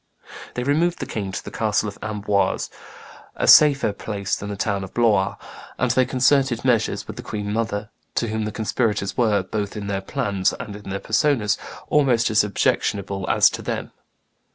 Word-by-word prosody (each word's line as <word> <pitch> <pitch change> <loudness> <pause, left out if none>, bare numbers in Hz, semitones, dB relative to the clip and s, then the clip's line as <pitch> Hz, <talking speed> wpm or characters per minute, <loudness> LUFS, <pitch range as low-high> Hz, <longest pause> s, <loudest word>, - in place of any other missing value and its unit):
They 125 - -2
removed 160 +6 +1
the - - -4
king 100 -3 -4
to 100 - -5
the - - -7
castle 105 -1 0
of 100 - -8
Amboise, 105 -2 -1 0.6
a - - -1
safer 140 -8 +7
place 100 -1 -3
than 100 - -6
the 100 - -4
town 100 -1 -1
of 95 - -10
Blois; 105 -5 +2 0.4
and - - +1
they 130 -1 +3
concerted 130 -1 +2
measures 115 -4 +1
with - - -9
the - - -5
queen 105 -1 -4
mother, 110 -2 -2 0.2
to 115 - 0
whom 110 0 -2
the 105 - -3
conspirators 105 -2 -1
were, 105 -5 +2
both 105 +2 -4
in 105 - -5
their 100 -1 -2
plans 100 -4 -1
and 105 - -7
their 100 -1 -6
persons, 110 -2 +1 0.3
almost 125 -6 +3
as 110 -1 +4
objectionable 100 -1 -1
as - - +5
to - - -5
them. - - -4
105 Hz, 175 wpm, -22 LUFS, 100-120 Hz, 0.6 s, safer